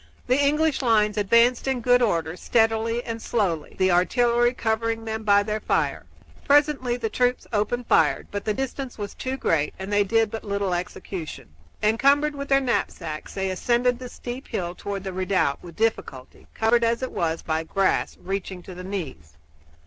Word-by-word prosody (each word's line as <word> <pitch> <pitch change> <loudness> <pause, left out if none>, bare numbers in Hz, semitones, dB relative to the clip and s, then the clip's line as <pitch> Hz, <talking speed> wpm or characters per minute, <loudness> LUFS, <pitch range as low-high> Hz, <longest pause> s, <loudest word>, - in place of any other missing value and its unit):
The 255 +3 +2
English 300 +1 +2
lines 215 -4 +3
advanced 235 +5 +3
in 265 -2 0
good 245 +1 +4
order, 165 -8 0
steadily 225 +3 +1
and 230 -1 -5
slowly, 180 -11 -1
the 185 0 +3
artillery 240 +6 +3
covering 225 -1 -1
them 220 0 -3
by 205 -1 +4
their 215 +1 -2
fire. 145 - -1 0.4
Presently 285 -4 +3
the 235 - -2
troops 245 +3 0
opened 235 +4 0
fire, - - +3
but 205 0 -4
the 215 - 0
distance 270 0 -4
was 205 -2 -5
too 260 +1 -4
great 150 - 0
and 190 +2 -5
they 205 0 +4
did 225 +1 +1
but 225 - -5
little 200 -2 -1
execution. 175 - -6 0.3
Encumbered 275 +8 +3
with 280 0 -6
their 275 0 +5
knapsacks 165 - -3
they 190 -1 -1
ascended 240 +5 +1
the 250 -1 -7
steep 245 +3 -7
hill 175 -2 -3
toward 200 +1 -5
the 190 -1 -5
redoubt 185 -6 0
with 170 -2 -11
difficulty, 215 - -3
covered, 235 +1 +3
as 230 +2 +1
it 260 - -3
was, 165 -1 -2
by 160 0 -1
grass 195 +4 0
reaching 190 -1 -4
to 185 - -9
the 180 +1 -8
knees. 175 - -6
220 Hz, 175 wpm, -24 LUFS, 185-245 Hz, 0.4 s, their